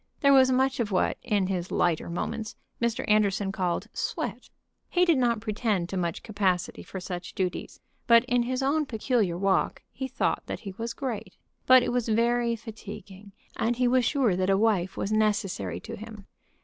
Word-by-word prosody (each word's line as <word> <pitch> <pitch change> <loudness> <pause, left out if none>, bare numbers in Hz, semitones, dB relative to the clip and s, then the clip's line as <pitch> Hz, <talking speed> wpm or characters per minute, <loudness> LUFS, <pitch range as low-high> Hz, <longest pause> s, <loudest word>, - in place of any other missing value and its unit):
There 280 -2 +6
was 260 -1 +6
much 265 +1 +2
of 220 -3 -1
what, 185 - +1
in 205 -3 +1
his 185 -1 -2
lighter 170 -2 +1
moments, 220 +6 -4 0.3
Mr. 235 -1 0
Anderson 205 -2 +2
called 180 -3 -1
"sweat." - - -4 0.4
He 360 0 +3
did 330 -6 +3
not 235 -3 +1
pretend 210 -5 -1
to - - -4
much 170 -3 -2
capacity 190 -5 -1
for 190 - -7
such 180 -1 -6
duties; 185 -2 -3 0.3
but 235 0 +6
in 245 -1 +2
his 255 +2 -1
own 295 +2 +1
peculiar 220 -6 0
walk 195 0 +1
he 265 +1 -4
thought 260 - 0
that - - -5
he 195 -3 -7
was 230 0 -3
great. 250 -6 -5 0.3
But 255 -1 +8
it - - -1
was 240 -2 -1
very 235 +1 +2
fatiguing, 205 -3 -10 0.2
and 235 +2 0
he 250 +1 +2
was 255 +1 +3
sure 245 -6 +2
that 185 +1 0
a 195 - +4
wife 195 -4 +1
was 200 - -2
necessary 195 - 0
to - - -7
him. 215 -2 -10
215 Hz, 185 wpm, -27 LUFS, 190-245 Hz, 0.4 s, But